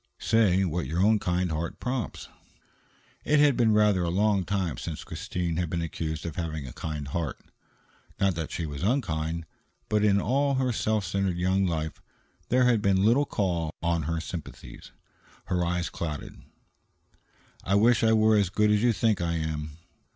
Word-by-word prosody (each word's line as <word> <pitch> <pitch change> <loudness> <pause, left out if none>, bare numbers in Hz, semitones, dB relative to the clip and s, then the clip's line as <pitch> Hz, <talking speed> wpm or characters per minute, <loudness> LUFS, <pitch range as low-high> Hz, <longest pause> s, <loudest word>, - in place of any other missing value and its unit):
"Say 95 -4 +3
what 85 0 -2
your 85 +3 -2
own 110 +1 +4
kind 90 -1 -1
heart 80 +2 -3
prompts." 125 -4 -4 1.0
It 150 - +3
had 145 -2 +5
been 115 -3 +3
rather 105 -3 +3
a 85 - 0
long 100 +1 +2
time 95 -9 -1
since 80 -2 -5
Christine 85 -2 -3
had 85 -2 -1
been 85 0 -2
accused 80 -1 -4
of 85 - -5
having 80 -4 -3
a 65 - -8
kind 75 -3 -5
heart. 80 -1 -3 0.8
Not 95 -1 +3
that 80 -2 -4
she 85 - -3
was 75 -2 -6
unkind, 85 - -1 0.4
but 105 -1 +2
in 100 -1 +4
all 140 +7 +1
her 130 -1 +1
self 110 -2 0
centered 95 0 -1
young 95 +2 +1
life 80 -2 -3 0.5
there 125 +1 +4
had 120 -4 +3
been 100 -1 +2
little 125 +6 +4
call 85 -6 -1
on 85 -1 +1
her 85 0 -1
sympathies. 85 0 -8 0.5
Her 90 -1 0
eyes 85 0 -1
clouded. 75 -3 -6 1.2
"I 100 - +1
wish 115 +3 +4
I 110 - +4
were 110 0 +4
as 100 -3 +2
good 105 +2 +2
as 105 0 +3
you 120 0 +3
think 110 -3 +1
I 85 -1 0
am." 80 -2 -4
90 Hz, 175 wpm, -27 LUFS, 80-105 Hz, 1.2 s, had